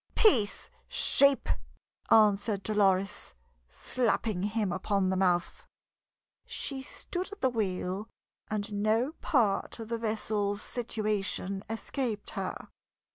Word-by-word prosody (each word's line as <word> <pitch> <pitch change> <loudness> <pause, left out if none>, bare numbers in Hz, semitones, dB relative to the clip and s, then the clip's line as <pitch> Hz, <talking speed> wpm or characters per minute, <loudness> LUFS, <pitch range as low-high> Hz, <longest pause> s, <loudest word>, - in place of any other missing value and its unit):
"Peace, 235 - +3 0.2
sheep!" 280 -1 +4 0.6
answered 205 -2 +4
Dolores, 195 - +1 0.3
slapping 215 - 0
him 205 -1 0
upon 190 +1 0
the - - +1
mouth. 180 -2 0 0.8
She 270 -2 -3
stood 360 +7 -5
at 410 - -10
the 260 - +3
wheel, 195 -2 -2 0.4
and 210 0 -3
no 215 +6 +1
part 225 -9 +1
of 225 -2 -8
the 230 -1 -2
vessel's 210 -2 -1
situation 210 -4 -1
escaped 225 -1 -3
her. - - -5
210 Hz, 105 wpm, -30 LUFS, 195-230 Hz, 0.8 s, sheep